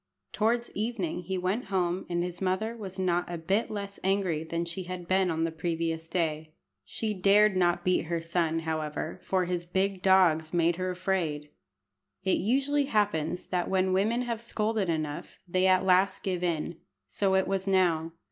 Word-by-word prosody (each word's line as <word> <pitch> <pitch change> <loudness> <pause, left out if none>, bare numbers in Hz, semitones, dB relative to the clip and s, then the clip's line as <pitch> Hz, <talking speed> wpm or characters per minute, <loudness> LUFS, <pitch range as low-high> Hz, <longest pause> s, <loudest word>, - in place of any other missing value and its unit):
Towards 235 +2 0
evening 210 -6 -2
he 190 +2 -3
went 185 +6 -1
home, 185 -2 -1
and 175 0 0
his 180 0 -5
mother 190 +5 -1
was 195 -4 -8
not 180 -2 0
a 175 - -3
bit 195 +7 0
less 200 -1 -5
angry 190 -5 +1
than 170 +1 -3
she 170 +2 -4
had 180 -1 -6
been 185 0 +2
on 165 -1 0
the 165 - 0
previous 165 0 -2
day. 155 -3 -2 0.3
She 215 - -3
dared 200 +1 +4
not 175 -1 +2
beat 185 -2 +2
her 170 +1 -1
son, 165 -1 0
however, 155 -1 -3
for 185 -1 +1
his 175 -1 -2
big 190 +2 -1
dogs 175 -4 +4
made 170 0 +2
her 185 0 -2
afraid. 175 -5 -2 0.7
It 190 - +2
usually 275 +6 +1
happens 200 - 0
that 180 -2 -1
when 190 0 +2
women 220 +6 +2
have 235 -2 -3
scolded 215 -4 -1
enough 155 -2 -3
they 185 +2 +2
at 185 0 +4
last 190 +1 +3
give 180 -2 -2
in. 170 -1 -1 0.3
So 190 - 0
it 190 - +2
was 195 0 -1
now. 170 -4 +2
185 Hz, 175 wpm, -28 LUFS, 170-195 Hz, 0.7 s, dared